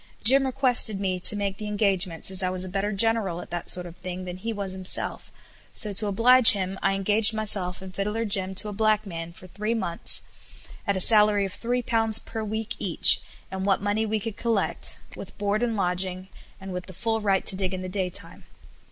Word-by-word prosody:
Jim 265 +4 +7
requested 250 -6 +2
me 185 -2 -2
to 185 - +5
make 200 -1 -3
the 215 - -7
engagements, 195 -4 -1
as 190 - +4
I 185 - 0
was 185 0 -4
a - - -8
better 200 +2 -3
general 210 -4 0
at - - -11
that 175 -1 -5
sort 180 -1 +3
of 170 -1 -11
thing 185 0 -7
than 180 0 -7
he 225 +5 -5
was 200 -3 -5
himself, 185 0 0 0.4
so 210 -2 -1
to 210 +2 -2
oblige 245 +4 +7
him 190 -1 -4
I 195 0 0
engaged 210 +3 +2
myself 195 -4 0
and 190 -1 -10
Fiddler 210 +4 -3
Jim 190 -2 -1
to 210 - +1
a - - -6
black 215 0 0
man 165 -3 -7
for 185 - -15
three 210 +5 -4
months, 170 -7 +1 0.6
at 200 -1 0
a - - -2
salary 210 0 +4
of 190 - -7
three 245 +3 -3
pounds 225 -1 +2
per 220 - -7
week 220 +3 -5
each, - - +4 0.3
and 190 0 -5
what 195 -1 +1
money 210 +2 -1
we 215 0 -2
could 220 +1 -7
collect, 230 -4 -1 0.2
with - - -11
board 205 +1 -2
and 230 -2 -2
lodging, 185 0 -2 0.3
and 190 -1 -9
with 180 0 -7
the 185 - -11
full 225 +4 -3
right 195 -2 0
to - - +3
dig 190 -1 -2
in 185 -1 -6
the - - -6
day 185 -1 -3
time. - - -7
200 Hz, 220 wpm, -24 LUFS, 185-220 Hz, 0.6 s, Jim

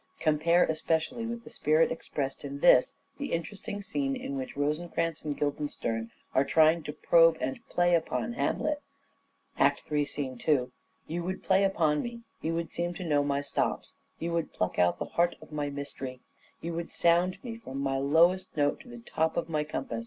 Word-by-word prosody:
Compare 160 +3 +4
especially 165 +9 -1
with 235 0 -5
the - - -12
spirit 155 +2 +3
expressed 140 -4 -4
in 140 0 -5
this, 125 - +6 0.2
the 285 - -3
interesting 200 +4 -4
scene 275 +6 -1
in 265 +2 -5
which 260 - -5
Rosencrantz 160 +2 -1
and 145 -2 -3
Guildenstern 140 -6 -2 0.2
are 135 - +4
trying 160 +3 +4
to 150 - -5
probe 165 +2 +5
and 270 - -2
"play 175 0 +3
upon" 170 +7 0
Hamlet 300 +4 0 0.8
(III. 145 -3 0
2). 130 -4 +2 0.3
"You 170 +2 -3
would 185 +2 -4
play 190 +1 +4
upon 160 -6 +2
me; 235 -1 -6 0.2
you 165 +1 -1
would 170 0 -3
seem 175 +1 -2
to 185 - -5
know 145 -3 +3
my 140 0 0
stops; 145 - -2 0.2
you 170 +1 -3
would 165 -1 -1
pluck 90 0 -1
out 90 0 +4
the - - -3
heart 175 0 +1
of - - -14
my 145 -1 -2
mystery; 140 -2 -6 0.4
you 170 +1 -4
would 170 0 -4
sound 175 +2 +3
me 230 -2 -5
from 135 -13 -7
my 135 -1 0
lowest 170 +6 +3
note 145 -1 +2
to 250 - -14
the 240 - -9
top 160 -9 -1
of 170 -1 -1
my 155 -2 0
compass. 135 -6 -4
165 Hz, 180 wpm, -29 LUFS, 145-180 Hz, 0.8 s, this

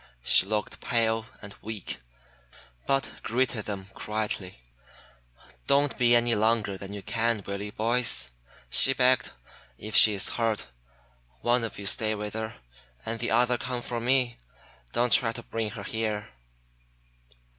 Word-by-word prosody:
She 95 - +5
looked 105 0 -3
pale 115 -1 0 0.2
and 100 0 -8
weak, 110 -3 -6 0.9
but 135 0 0
greeted 120 -2 -1
them 100 -2 -5
quietly. 105 - -3 1.1
"Don't 140 0 +3
be 120 -1 +4
any 120 0 +3
longer 110 -2 +1
than 95 +1 -8
you 100 -1 -7
can, 115 -2 -1
will 100 0 -4
you, 105 0 -5
boys?" 115 - +1 0.4
she 135 - +8
begged. 130 0 +3 0.5
"If 105 0 -6
she 110 - +8
is 100 - 0
hurt 115 -3 -1 0.8
one 120 0 +2
of 115 - -4
you 100 - -7
stay 110 +2 0
with 105 0 -5
her, 110 0 -5 0.5
and 115 0 -3
the 120 - -2
other 120 +1 +2
come 125 -1 -4
for 120 - -3
me. 125 0 +2 0.5
Don't 120 0 +1
try 115 -3 +4
to - - -7
bring 115 -1 -3
her 100 0 -8
here." 110 -1 -3
115 Hz, 145 wpm, -27 LUFS, 105-120 Hz, 1.1 s, she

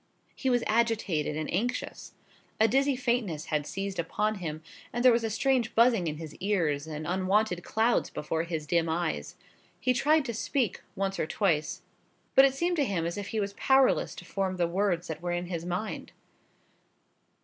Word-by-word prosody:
He 265 - -2
was 245 -2 +2
agitated 215 -9 +1
and 155 - -2
anxious. 235 +7 -3 0.5
A 220 - +6
dizzy 270 +4 +2
faintness 235 - -1
had 150 -1 -1
seized 195 -1 -4
upon 210 +5 -1
him, 155 -3 -5 0.3
and 240 +1 -2
there 255 - +9
was 235 0 +2
a 225 - 0
strange 240 +1 +1
buzzing 230 -6 +4
in 155 -1 -3
his 155 -2 -8
ears, 165 -7 0
and 155 0 -5
unwonted 185 +1 +1
clouds 225 +2 +1
before 160 +2 -2
his 165 -2 -4
dim 165 +1 +1
eyes. 160 - -2 0.4
He 250 +6 +2
tried 300 +4 +3
to 235 - -3
speak 235 +1 -1
once 195 0 -2
or - - 0
twice, 165 -6 0 0.5
but 270 - +8
it 270 -1 +1
seemed 345 +4 0
to 295 - +3
him 190 -9 -1
as 170 - -2
if 205 -1 -5
he 220 - -2
was 200 -1 -2
powerless 265 +4 +3
to 180 - -10
form 190 0 -2
the 175 -1 +2
words 180 -1 0
that 160 -2 -6
were 175 0 -2
in 175 0 -2
his 175 -1 -4
mind. 180 +5 -4
195 Hz, 185 wpm, -29 LUFS, 170-235 Hz, 0.5 s, there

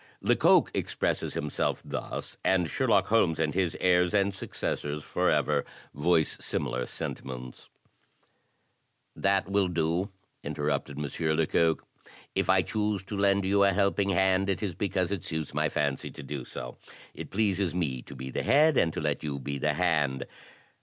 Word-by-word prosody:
Lecoq - - +4
expresses - - -1
himself 75 0 -1
thus, - - -5
and 95 -3 +2
Sherlock 105 - +2
Holmes 95 -8 +3
and 80 -2 0
his 90 -3 0
heirs 90 0 +3
and 100 -1 +2
successors 75 -5 -3
forever, - - +1 0.3
voice 80 +2 +2
similar 60 +1 -2
sentiments: 65 -2 -7 1.5
"That 95 -1 +1
will 100 -1 +2
do," 85 +3 0 0.3
interrupted 70 -1 -2
M. 75 -1 -2 0.3
Lecoq. 80 0 +2 0.5
"If 95 -2 0
I 95 0 +5
choose 105 +1 -1
to 100 - -6
lend 100 0 +2
you 100 +1 +3
a 100 - +5
helping 100 +1 +2
hand, 95 0 +2
it 95 +2 -1
is 95 -4 -1
because 95 0 -1
it 100 -4 -2
suits 80 -3 -4
my - - +1
fancy 70 -2 -1
to - - -9
do 70 -2 -5
so. - - -7 0.4
It - - -8
pleases 100 -4 0
me 70 -8 -1
to 70 - -11
be 65 +1 -6
the - - -2
head, 150 0 +4
and 80 - +3
to - - -3
let 75 -2 -1
you 75 -3 -3
be 70 +1 -4
the - - +1
hand. 75 -7 +1
90 Hz, 160 wpm, -28 LUFS, 75-100 Hz, 1.5 s, I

